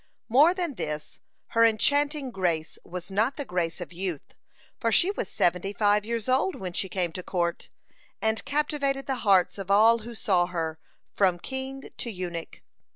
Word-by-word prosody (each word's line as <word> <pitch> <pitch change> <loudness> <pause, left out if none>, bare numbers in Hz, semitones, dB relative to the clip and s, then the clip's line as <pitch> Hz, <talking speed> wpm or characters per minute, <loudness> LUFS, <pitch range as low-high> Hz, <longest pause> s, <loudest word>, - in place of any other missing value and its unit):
(67) - - -11
More 300 +7 +7
than 350 -5 -2
this, 150 - -5 0.3
her 230 - +4
enchanting 285 +5 +2
grace 170 -6 -1
was 180 +2 -7
not 220 +7 +1
the 285 - -3
grace 180 -5 -1
of 175 0 -7
youth, 175 -4 -4 0.5
for 230 - +1
she 360 - +4
was 400 - -4
seventy 180 +3 +1
five 205 0 +3
years 230 0 -3
old 265 +9 +2
when 185 -2 -5
she 190 - -2
came 180 -2 -1
to 180 - -6
court, 175 -1 -2 0.5
and 220 0 0
captivated 285 -2 0
the 265 -2 -1
hearts 195 -2 +3
of 195 -1 -6
all 220 +3 +6
who 230 +2 -9
saw 185 -6 +2
her, 165 -3 -3 0.3
from 185 -3 +3
king 265 +6 -6
to 240 - -4
eunuch. 180 -5 -6
205 Hz, 175 wpm, -27 LUFS, 180-265 Hz, 0.5 s, More